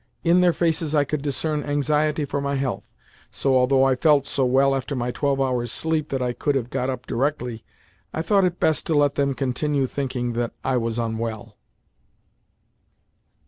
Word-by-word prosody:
In 175 Hz, +1 st, +4 dB
their 180 Hz, -1 st, +5 dB
faces 160 Hz, -2 st, 0 dB
I 145 Hz, -, +4 dB
could 145 Hz, 0 st, -3 dB
discern 150 Hz, +1 st, -2 dB
anxiety 150 Hz, +1 st, 0 dB
for 140 Hz, 0 st, -3 dB
my 140 Hz, 0 st, -1 dB
health, 135 Hz, -2 st, -2 dB, 0.5 s
so, 135 Hz, -1 st, 0 dB
although 130 Hz, +1 st, +4 dB
I 135 Hz, -1 st, +3 dB
felt 145 Hz, 0 st, +3 dB
so 135 Hz, -, 0 dB
well 135 Hz, +2 st, +3 dB
after 135 Hz, +1 st, -3 dB
my 125 Hz, -1 st, -2 dB
twelve 140 Hz, +1 st, 0 dB
hours' 125 Hz, -3 st, 0 dB
sleep 160 Hz, 0 st, -1 dB
that 135 Hz, -2 st, -1 dB
I 125 Hz, -1 st, -1 dB
could 145 Hz, +3 st, -1 dB
have 125 Hz, -2 st, -2 dB
got 125 Hz, -, -1 dB
up 125 Hz, -2 st, -4 dB
directly, 125 Hz, -3 st, -2 dB, 0.5 s
I 160 Hz, -, -3 dB
thought 195 Hz, +3 st, +3 dB
it 180 Hz, -1 st, 0 dB
best 160 Hz, -, +1 dB
to 160 Hz, -, +1 dB
let 145 Hz, -1 st, +3 dB
them 140 Hz, -1 st, 0 dB
continue 135 Hz, +2 st, 0 dB
thinking 125 Hz, -3 st, -3 dB
that 120 Hz, 0 st, -2 dB
I 130 Hz, -, 0 dB
was 115 Hz, -1 st, -2 dB
unwell. 115 Hz, -1 st, -4 dB
135 Hz, 185 wpm, -23 LUFS, 125-150 Hz, 0.5 s, their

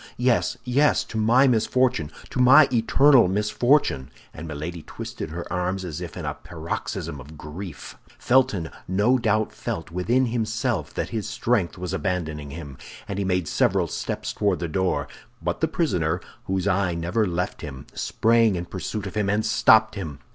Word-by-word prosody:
Yes, 125 Hz, -1 st, +1 dB
yes! 140 Hz, +4 st, +3 dB
to 110 Hz, -, -7 dB
my 120 Hz, +5 st, +5 dB
misfortune, 120 Hz, -, +2 dB, 0.2 s
to -, -, -3 dB
my 130 Hz, +4 st, +8 dB
eternal 125 Hz, +1 st, +5 dB
misfortune!" 105 Hz, -, +1 dB, 0.2 s
and 80 Hz, +2 st, -8 dB
Milady 80 Hz, +3 st, -5 dB
twisted -, -, -7 dB
her 85 Hz, +2 st, -5 dB
arms 90 Hz, +1 st, -1 dB
as 85 Hz, -1 st, -5 dB
if 85 Hz, -3 st, -7 dB
in -, -, -5 dB
a -, -, -2 dB
paroxysm -, -, -5 dB
of 75 Hz, +5 st, -12 dB
grief. 75 Hz, +2 st, -8 dB, 0.2 s
Felton 105 Hz, -10 st, +2 dB, 0.2 s
no 105 Hz, +8 st, +3 dB
doubt 110 Hz, -2 st, +1 dB
felt 80 Hz, 0 st, -5 dB
within 115 Hz, +9 st, +1 dB
himself 115 Hz, -1 st, -1 dB
that -, -, -2 dB
his 110 Hz, -2 st, -3 dB
strength 110 Hz, -4 st, 0 dB
was 90 Hz, 0 st, -4 dB
abandoning 80 Hz, -7 st, -2 dB
him, 70 Hz, -3 st, -9 dB, 0.3 s
and 100 Hz, 0 st, -3 dB
he -, -, 0 dB
made 90 Hz, -3 st, 0 dB
several -, -, +2 dB
steps -, -, -4 dB
toward 100 Hz, -3 st, +1 dB
the 85 Hz, -, -3 dB
door; 95 Hz, +3 st, 0 dB, 0.3 s
but -, -, -3 dB
the -, -, +3 dB
prisoner, -, -, 0 dB, 0.3 s
whose 95 Hz, 0 st, -1 dB
eye 95 Hz, -3 st, +1 dB
never 90 Hz, +6 st, 0 dB
left 90 Hz, +2 st, -3 dB
him, 65 Hz, -3 st, -8 dB
sprang 115 Hz, -2 st, +2 dB
in 85 Hz, 0 st, -3 dB
pursuit 95 Hz, +4 st, -5 dB
of 95 Hz, -, -6 dB
him 105 Hz, -2 st, 0 dB
and 105 Hz, +2 st, +1 dB
stopped 110 Hz, 0 st, +5 dB
him. 80 Hz, -9 st, -6 dB
100 Hz, 170 wpm, -24 LUFS, 85-115 Hz, 0.3 s, my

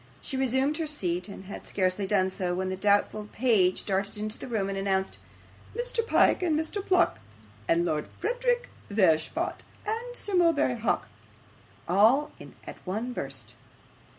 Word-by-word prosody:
She 270 Hz, -, -5 dB
resumed 265 Hz, +3 st, +1 dB
her 325 Hz, -2 st, -2 dB
seat, 180 Hz, -, -1 dB
and 195 Hz, -, -9 dB
had 195 Hz, -, -8 dB
scarcely 190 Hz, +1 st, 0 dB
done 190 Hz, -2 st, +2 dB
so, 180 Hz, -2 st, -2 dB
when 185 Hz, +1 st, -1 dB
the 185 Hz, -, -2 dB
doubtful 205 Hz, +2 st, +1 dB
page 210 Hz, -7 st, +2 dB
darted 200 Hz, +1 st, -1 dB
into 215 Hz, +1 st, -3 dB
the -, -, -6 dB
room 220 Hz, -5 st, -1 dB
and 195 Hz, -, -3 dB
announced, 195 Hz, -1 st, -1 dB, 0.6 s
Mr. 485 Hz, -1 st, -1 dB
Pyke, 455 Hz, -, +4 dB
and 320 Hz, -4 st, +2 dB
Mr. 375 Hz, +5 st, -3 dB
Pluck, 360 Hz, -, +3 dB, 0.5 s
and 170 Hz, +1 st, +3 dB
Lord 150 Hz, -3 st, -1 dB, 0.8 s
Verisopht, 195 Hz, -, +1 dB, 0.2 s
and 460 Hz, +3 st, -3 dB
Sir 410 Hz, -, -4 dB
Mulberry 330 Hz, -8 st, +3 dB
Hawk, 225 Hz, -, 0 dB, 0.8 s
all 225 Hz, -, +4 dB, 0.3 s
at -, -, -8 dB
one 220 Hz, +7 st, -3 dB
burst. -, -, -5 dB
210 Hz, 150 wpm, -28 LUFS, 190-300 Hz, 0.8 s, Pyke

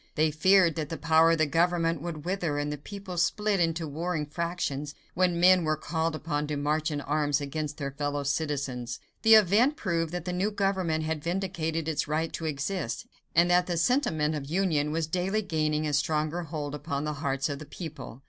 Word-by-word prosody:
They 155 Hz, 0 st, +3 dB
feared 180 Hz, +2 st, +4 dB
that 155 Hz, -2 st, -3 dB
the 165 Hz, -, -4 dB
power 160 Hz, +1 st, +4 dB
of -, -, +1 dB
the 155 Hz, -, +3 dB
government 165 Hz, 0 st, +1 dB
would 160 Hz, -2 st, -6 dB
wither 175 Hz, -5 st, -1 dB
and 145 Hz, 0 st, -1 dB
the -, -, -5 dB
people 195 Hz, +2 st, -8 dB
split 210 Hz, +3 st, +1 dB
into 165 Hz, -1 st, 0 dB
warring 160 Hz, +1 st, -2 dB
factions 150 Hz, -2 st, -3 dB, 0.2 s
when 180 Hz, -2 st, +2 dB
men 180 Hz, 0 st, +6 dB
were 155 Hz, -1 st, +1 dB
called 160 Hz, +1 st, -1 dB
upon 150 Hz, -2 st, -2 dB
to 150 Hz, -1 st, -2 dB
march 150 Hz, +2 st, 0 dB
in 145 Hz, -2 st, -3 dB
arms 145 Hz, -1 st, +1 dB
against 150 Hz, +1 st, -4 dB
their 140 Hz, -3 st, -3 dB
fellow 145 Hz, +1 st, -2 dB
citizens. 140 Hz, -4 st, -2 dB, 0.2 s
The 225 Hz, 0 st, +8 dB
event 215 Hz, -, +5 dB
proved 165 Hz, -, -1 dB
that 175 Hz, -2 st, -4 dB
the 180 Hz, -, -2 dB
new 185 Hz, +4 st, +1 dB
government 190 Hz, -6 st, 0 dB
had 155 Hz, -1 st, -3 dB
vindicated 165 Hz, -3 st, -2 dB
its 155 Hz, -2 st, -1 dB
right 155 Hz, +2 st, -1 dB
to 165 Hz, -, -4 dB
exist, 155 Hz, +5 st, -3 dB, 0.3 s
and 175 Hz, +1 st, +5 dB
that 180 Hz, 0 st, +4 dB
the 175 Hz, -2 st, -1 dB
sentiment 165 Hz, -, +2 dB
of 145 Hz, -2 st, -5 dB
union 160 Hz, -4 st, +1 dB
was 160 Hz, +1 st, 0 dB
daily 185 Hz, +6 st, -1 dB
gaining 155 Hz, -4 st, 0 dB
a 150 Hz, -, -1 dB
stronger 155 Hz, +3 st, 0 dB
hold 150 Hz, -2 st, -4 dB
upon 145 Hz, -1 st, -3 dB
the 150 Hz, 0 st, -2 dB
hearts 135 Hz, -2 st, 0 dB
of 140 Hz, -2 st, -4 dB
the 155 Hz, -, -8 dB
people. 150 Hz, -6 st, -8 dB
160 Hz, 200 wpm, -28 LUFS, 150-175 Hz, 0.3 s, The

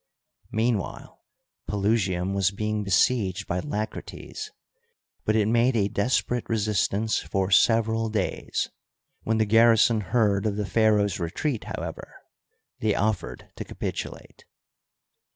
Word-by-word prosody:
Meanwhile, 110 Hz, -3 st, -2 dB, 0.5 s
Pelusium 100 Hz, -3 st, 0 dB
was 95 Hz, -1 st, +2 dB
being 105 Hz, +1 st, -2 dB
besieged 100 Hz, 0 st, +2 dB
by 90 Hz, -, -2 dB
Lacrates, 145 Hz, -, -5 dB, 0.8 s
but 110 Hz, -, +2 dB
it 105 Hz, -2 st, +3 dB
made 120 Hz, +3 st, +3 dB
a 100 Hz, -3 st, +2 dB
desperate 120 Hz, +3 st, 0 dB
re 115 Hz, -, +1 dB
sistance 105 Hz, +1 st, 0 dB
for 95 Hz, 0 st, -1 dB
several 110 Hz, +2 st, +3 dB
days; 105 Hz, -4 st, -2 dB, 0.5 s
when 110 Hz, 0 st, 0 dB
the 110 Hz, -, +3 dB
garrison 115 Hz, 0 st, +5 dB
heard 105 Hz, 0 st, +1 dB
of 105 Hz, -, -1 dB
the 105 Hz, 0 st, -2 dB
pharaoh's 105 Hz, -2 st, +2 dB
retreat, 105 Hz, -, -2 dB
however, -, -, -6 dB, 0.6 s
they 110 Hz, -2 st, +1 dB
offered 110 Hz, +1 st, -2 dB
to -, -, -4 dB
capitulate. -, -, -6 dB
105 Hz, 115 wpm, -26 LUFS, 100-115 Hz, 0.8 s, garrison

